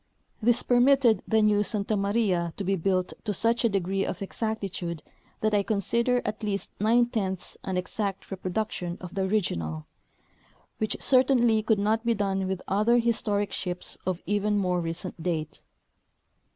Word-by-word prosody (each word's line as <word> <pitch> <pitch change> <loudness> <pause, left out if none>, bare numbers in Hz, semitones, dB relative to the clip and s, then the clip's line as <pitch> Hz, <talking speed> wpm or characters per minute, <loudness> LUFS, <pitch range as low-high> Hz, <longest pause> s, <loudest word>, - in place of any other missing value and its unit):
This 235 +2 +3
permitted 245 -3 +4
the 220 -1 +3
new 210 -1 +4
Santa 210 +1 -1
Maria 200 -5 +1
to 200 - -3
be 195 +1 +1
built 185 +1 0
to 210 -3 -1
such 230 +5 +1
a 230 - +4
degree 195 -1 0
of - - -3
exactitude 195 -6 -4 0.4
that 215 0 +1
I 205 - +4
consider 235 +5 +1
at 210 - -3
least 205 -2 -3
nine 230 +4 +4
tenths 195 -6 -3
an 190 -1 -2
exact 195 +2 -3
reproduction 185 -2 -3
of 180 -1 -9
the 195 - -1
original, 85 - -1 0.9
which 215 - -1
certainly 250 -4 +4
could 220 0 +2
not 215 +3 +1
be 235 -1 +2
done 195 -2 0
Avith 190 -1 -2
other 215 +5 +3
historic 210 -4 0
ships 180 -1 -4
of 185 -1 -2
even 205 0 +1
more 180 -3 +1
recent 170 +1 -5
date. 160 -3 -3
205 Hz, 155 wpm, -27 LUFS, 185-220 Hz, 0.9 s, permitted